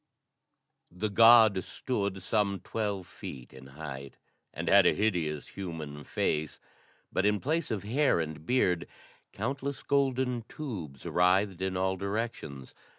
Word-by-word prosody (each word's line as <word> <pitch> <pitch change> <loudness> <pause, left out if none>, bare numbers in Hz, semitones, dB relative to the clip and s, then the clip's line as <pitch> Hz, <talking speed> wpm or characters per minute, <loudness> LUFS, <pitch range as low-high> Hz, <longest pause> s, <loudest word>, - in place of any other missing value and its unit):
The 95 +5 -3
god 110 -3 +7
stood 100 -6 -3
some 100 -2 +1
twelve 100 -4 -3
feet 65 -6 -9
in 65 0 -12
height 70 -1 -8 0.3
and - - -5
had - - +7
a - - +4
hideous 85 -8 -1
human 80 -6 -6
face, 75 0 -1 0.5
but, - - +1
in 105 0 +3
place 160 +6 -1
of 105 -3 -2
hair 130 - +2
and 80 -2 -4
beard, 90 -5 +1 0.4
countless 135 +5 -3
golden 130 -3 +1
tubes 90 - -7
writhed 95 +1 +2
in 95 -1 -1
all 95 0 0
directions. 100 - -4
100 Hz, 130 wpm, -30 LUFS, 80-115 Hz, 0.5 s, god